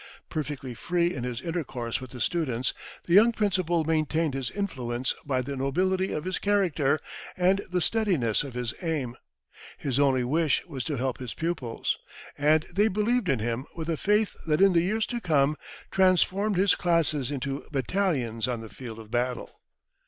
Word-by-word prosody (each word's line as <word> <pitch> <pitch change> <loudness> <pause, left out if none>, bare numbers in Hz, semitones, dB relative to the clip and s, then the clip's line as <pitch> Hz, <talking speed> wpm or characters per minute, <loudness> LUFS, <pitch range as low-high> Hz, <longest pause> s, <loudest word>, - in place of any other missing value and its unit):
Perfectly 145 -4 -4
free 175 +7 0
in 125 - -4
his 125 0 -3
intercourse 135 -9 -3
with 130 - -8
the 125 - -9
students, 130 -3 0 0.3
the 170 - 0
young 220 +5 +7
principal 185 -6 +1
maintained 155 -1 +1
his 135 -3 -2
influence 130 -11 -2
by 130 -2 +1
the 140 +2 -4
nobility 185 +8 +1
of 150 - -2
his 185 0 -2
character 170 -8 +2 0.4
and 185 +2 +3
the 180 0 0
steadiness 170 - +1
of 135 -4 -8
his 125 -1 -2
aim. 150 -8 -2 0.6
His 135 -1 -1
only 135 -3 +3
wish 150 +4 +1
was 140 -7 -5
to 150 - -1
help 130 0 -2
his 125 -3 -6
pupils. 160 -9 -2 0.4
And 150 +2 +3
they 205 +4 +4
believed 215 0 +1
in 135 - +3
him 115 +4 -2
with 165 0 -4
a - - +1
faith 210 +5 +1
that 150 -1 +2
in 195 -1 +6
the 170 - +5
years 215 +5 +1
to 240 -1 -4
come 150 -5 +3 0.4
transformed 190 +2 +3
his 195 +1 +5
classes 155 -6 +1
into 140 -1 -3
battalions 135 - 0
on 120 -3 -2
the 110 - -9
field 115 -2 -8
of 110 -1 -11
battle. 125 +1 -2
155 Hz, 175 wpm, -27 LUFS, 130-185 Hz, 0.6 s, young